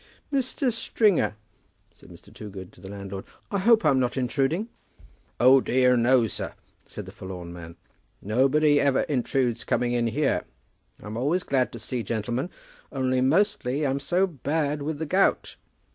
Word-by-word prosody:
"Mr. 265 -1 0
Stringer," 210 - +1 0.6
said - - -18
Mr. - - -15
Toogood 95 -3 -9
to - - -18
the 95 - -9
landlord, 100 -1 -7 0.3
"I 200 - 0
hope 225 0 +4
I'm 140 -3 +4
not 125 +1 -1
intruding." 135 - 0 0.7
"O 130 +2 +7
dear, 125 0 +3
no, 120 0 +4
sir," 110 - -4 0.3
said - - -8
the - - -10
forlorn 90 -2 -8
man. 85 -1 -10 0.4
"Nobody 140 +7 +3
ever 140 -2 +3
intrudes 125 -3 0
coming 120 -1 0
in 120 -1 +1
here. 140 +5 0 0.6
I'm 105 +2 -6
always 155 +9 0
happy 130 -2 +2
to - - -6
see 120 +2 -4
gentlemen, 120 - -2 0.4
only, 130 -1 0
mostly, 155 -2 +1
I'm 135 0 0
so 180 +6 +1
bad 150 -2 -2
with 150 +1 -3
the 160 - -3
gout." 190 +6 +1
130 Hz, 155 wpm, -26 LUFS, 115-155 Hz, 0.7 s, O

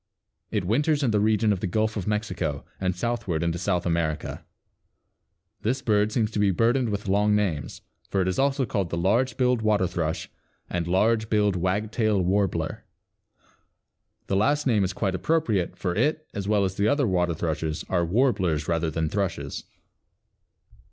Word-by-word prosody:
It 105 -4 -1
winters 145 - +1
in 125 - +2
the 105 - +2
region 110 0 +3
of 95 - -3
the 95 - -2
Gulf 110 +4 0
of 100 -2 -4
Mexico 100 -9 -2
and 95 -1 -1
southward 95 -6 -2
into 85 0 -1
South 90 -1 0
America. 85 -3 -2 1.2
This 130 +4 -1
bird 105 -2 +2
seems 110 -1 0
to 105 - -2
be 100 -1 +4
burdened 115 +6 +2
with 100 0 -3
long 105 +2 +3
names, 90 -10 -2 0.3
for 100 - 0
it 95 - +1
is 95 - -1
also 135 -1 +2
called 100 -6 -2
the 85 - -3
Large 115 +9 +1
billed 125 -2 +2
Water 105 -3 +2
thrush 85 -3 -2 0.4
and 85 -1 -2
Large 110 +5 +2
billed 105 -2 +2
Wagtail 105 +4 0
Warbler. 90 -3 0 1.4
The 95 - -1
last 145 +9 +2
name 110 -6 +3
is 95 - 0
quite 95 0 -1
appropriate 110 - 0
for 90 -2 -2
it, 150 - 0
as 100 -1 -4
well 105 -2 +3
as 95 0 -4
the 100 - +2
other 140 +4 +2
water 90 -4 +1
thrushes, 80 -1 -2
are 90 -2 +1
warblers 90 - +1
rather 85 -1 0
than 80 +1 -1
thrushes. 100 +2 -3
100 Hz, 170 wpm, -25 LUFS, 90-110 Hz, 1.4 s, be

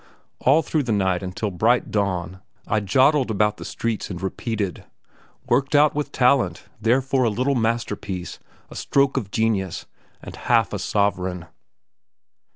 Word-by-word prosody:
All 150 +5 +4
through 155 +1 0
the 125 -4 -3
night 95 -3 +1
until 95 +3 -4
the 90 - -12
bright 120 +5 +2
dawn 95 -3 -2 0.2
I 105 - +1
"jodled" 130 +7 +3
about 105 0 +1
the - - -8
streets 115 -2 -3
and 90 -3 -5
repeated 100 0 -3 0.6
"Worked 140 +2 +1
out 150 +1 +5
with 150 0 -3
talent 130 +1 +2 0.2
therefore 130 +3 +2
a - - +3
little 125 +6 0
masterpiece 110 -6 -2 0.3
a - - -10
stroke 140 -1 +1
of 115 -8 -2
genius 100 -4 -1 0.3
and - - -10
half - - +1
a - - -2
sovereign." 95 -4 -1
110 Hz, 150 wpm, -23 LUFS, 95-130 Hz, 0.6 s, out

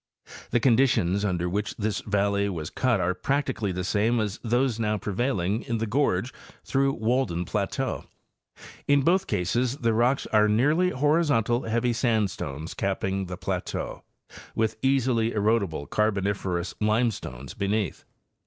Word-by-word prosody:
The 120 - +2
conditions 115 -6 +3
under 90 -3 0
which 100 +3 -2
this 105 -1 -1
valley 100 -1 +1
was 80 -5 -5
cut 125 -2 +1
are 90 +2 +1
practically 130 -2 -1
the 90 0 -3
same 110 +5 +1
as 105 -1 -2
those 120 0 +1
now 105 -1 0
pre 105 - -4
vailing 105 -3 0
in 120 -3 0
the 115 - -1
gorge 115 -2 0 0.3
through 135 0 +1
Walden 110 -7 0
plateau. - - -2 0.8
In 145 -1 +4
both 185 +5 +2
cases 120 +7 0
the 115 -5 +1
rocks 120 +4 +2
are 105 0 +5
nearly 150 +12 +3
horizontal, 140 - +2
heavy 120 +2 +1
sandstones 100 - -1
capping 95 0 -2
the 90 0 -6
plateau, - - -4 0.5
with 110 0 0
easily 125 -4 +2
erodible 100 -9 0
Carboniferous 100 -4 -1
limestones 105 - -1
beneath. 100 -1 -2
110 Hz, 135 wpm, -26 LUFS, 100-125 Hz, 0.8 s, are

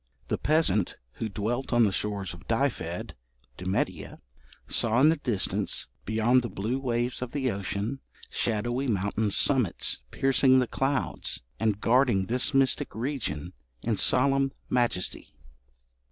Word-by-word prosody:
The - - -1
peasant 140 - +1 0.2
who 110 - -2
dwelt 110 +6 -3
on 120 -1 +4
the 105 - +3
shores 100 -1 -2
of 85 +1 -14
Dyfed 115 -8 -1 0.4
(Demetia) 95 +4 -3 0.5
saw 115 +1 +2
in 150 +4 +6
the 165 - +2
distance, 120 -9 -1 0.2
beyond 110 +4 +3
the 120 - -4
blue 115 +7 -2
waves 120 -1 -1
of 125 -1 -5
the 135 -4 0
ocean, 100 +6 -3 0.3
shadowy 120 +4 -1
mountain 105 0 0
summits 120 - +2
piercing 135 - +4
the 130 - +3
clouds, 135 - -1 0.2
and 105 -2 +1
guarding 120 -4 +3
this 120 +6 +1
mystic 135 -1 +2
region 110 - -3 0.3
in 115 -1 0
solemn 135 +4 +3 0.2
majesty. 120 -7 0
120 Hz, 130 wpm, -27 LUFS, 100-130 Hz, 0.5 s, in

